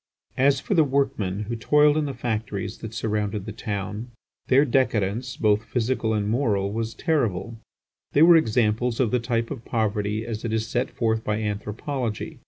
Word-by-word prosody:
As 135 Hz, +1 st, +4 dB
for -, -, -2 dB
the 165 Hz, -4 st, +5 dB
workmen 120 Hz, -9 st, 0 dB
who 110 Hz, +3 st, -3 dB
toiled 150 Hz, +5 st, +4 dB
in 155 Hz, -1 st, +1 dB
the 140 Hz, -2 st, -4 dB
factories 110 Hz, -4 st, -3 dB
that 110 Hz, -, -7 dB
surrounded 105 Hz, -2 st, -2 dB
the 110 Hz, -, -5 dB
town, 105 Hz, +1 st, -4 dB, 0.4 s
their 135 Hz, +3 st, +5 dB
decadence, 120 Hz, -2 st, 0 dB
both 105 Hz, 0 st, +2 dB
physical 115 Hz, -1 st, -1 dB
and 105 Hz, -1 st, -1 dB
moral, 105 Hz, -4 st, 0 dB
was 115 Hz, 0 st, -3 dB
terrible; 115 Hz, -, -1 dB, 0.5 s
they 145 Hz, -, +6 dB
were 170 Hz, 0 st, +8 dB
examples 120 Hz, -4 st, +2 dB
of 125 Hz, -5 st, +2 dB
the 125 Hz, -, +2 dB
type 115 Hz, -1 st, -1 dB
of 130 Hz, -5 st, -6 dB
poverty 105 Hz, -1 st, -1 dB
as 110 Hz, -2 st, -5 dB
it 115 Hz, -2 st, -2 dB
is 110 Hz, 0 st, 0 dB
set 125 Hz, 0 st, -1 dB
forth 110 Hz, -1 st, -1 dB
by 105 Hz, 0 st, -1 dB
anthropology. 105 Hz, +3 st, -4 dB
115 Hz, 175 wpm, -24 LUFS, 105-130 Hz, 0.5 s, were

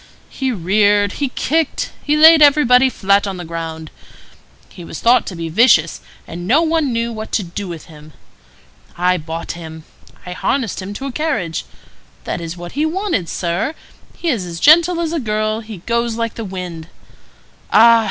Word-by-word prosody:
He 265 Hz, -1 st, -2 dB
reared, 205 Hz, +1 st, +2 dB
he 280 Hz, +3 st, -3 dB
kicked, 315 Hz, +4 st, -1 dB
he 300 Hz, 0 st, 0 dB
laid 320 Hz, +1 st, +8 dB
everybody 265 Hz, -3 st, +5 dB
flat 200 Hz, -3 st, +1 dB
on 195 Hz, -1 st, -4 dB
the 175 Hz, -, -7 dB
ground. 160 Hz, -1 st, -6 dB, 0.8 s
He 180 Hz, -, -12 dB
was -, -, -8 dB
thought 240 Hz, +2 st, +3 dB
to 185 Hz, -, -6 dB
be 165 Hz, -1 st, -5 dB
vicious, 170 Hz, -3 st, +3 dB, 0.3 s
and 175 Hz, +2 st, -7 dB
no 290 Hz, +10 st, +4 dB
one 320 Hz, -4 st, 0 dB
knew 230 Hz, 0 st, -2 dB
what 220 Hz, 0 st, -7 dB
to 210 Hz, -, +1 dB
do 185 Hz, +3 st, -6 dB
with 170 Hz, -3 st, -8 dB
him. 155 Hz, -1 st, -15 dB, 0.8 s
I 180 Hz, +1 st, +2 dB
bought 165 Hz, +1 st, -6 dB
him. 160 Hz, -2 st, -9 dB, 0.4 s
I 180 Hz, -, -7 dB
harnessed 230 Hz, +3 st, -2 dB
him 200 Hz, +2 st, -7 dB
to 270 Hz, -, -6 dB
a 275 Hz, -, -4 dB
carriage. 230 Hz, -, -2 dB, 0.6 s
That 170 Hz, -, -4 dB
is 165 Hz, +1 st, -6 dB
what 175 Hz, 0 st, -8 dB
he 290 Hz, -, -1 dB
wanted, 320 Hz, -, -1 dB
sir; 175 Hz, -, -2 dB, 0.4 s
he 340 Hz, -, -2 dB
is 230 Hz, -10 st, 0 dB
as 170 Hz, -2 st, -7 dB
gentle 335 Hz, -, +5 dB
as 330 Hz, -1 st, -2 dB
a 330 Hz, -, -1 dB
girl; 215 Hz, -2 st, -1 dB
he 215 Hz, -6 st, -10 dB
goes 235 Hz, 0 st, -1 dB
like 230 Hz, -1 st, -3 dB
the 230 Hz, -, -6 dB
wind. 180 Hz, -4 st, -7 dB, 0.8 s
Ah! 230 Hz, +2 st, +7 dB
210 Hz, 180 wpm, -18 LUFS, 175-265 Hz, 0.8 s, laid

